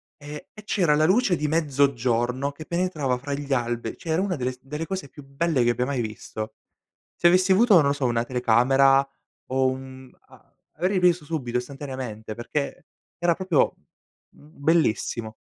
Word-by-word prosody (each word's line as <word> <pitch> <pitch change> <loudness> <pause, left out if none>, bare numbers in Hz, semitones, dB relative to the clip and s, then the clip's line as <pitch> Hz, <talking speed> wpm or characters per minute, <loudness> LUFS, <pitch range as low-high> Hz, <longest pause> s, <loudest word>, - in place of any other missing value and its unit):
e 145 0 -10
e 215 - -12
c'era 180 -7 +2
la 155 +1 +3
luce 195 0 +3
di 150 -1 -2
mezzogiorno, 135 -4 +1
che 155 +2 -10
penetrava 165 -8 -1
fra 140 +3 -5
gli 140 0 -5
alberi 120 -3 -1
c'è 160 -1 -3
una 190 -1 0
delle 130 -2 -2
s 125 - -14
delle 150 +4 -5
cose 185 -4 -5
più 145 - -13
belle 140 0 0
che 120 - +3
abbia 125 +1 -1
mai 135 -3 -1
visto. 110 0 -6 0.6
Se 175 - +4
avessi 185 +2 +4
avuto, 225 +1 +5
non 155 -5 +6
lo 140 - +3
so, 140 -2 -5
una 120 -1 +1
telecamera, 135 +3 +4 0.4
o 130 0 +2
un 130 0 -6 0.2
a - - -21 0.3
avrei 185 +1 +1
preso 175 -3 +3
subito 130 -6 -2
istantaneamente, 125 -5 -7
perché 140 +4 -4 0.3
era 175 -1 +2
proprio 185 -5 +1 0.6
bellissimo. 140 -7 -1
140 Hz, 165 wpm, -25 LUFS, 125-165 Hz, 0.6 s, non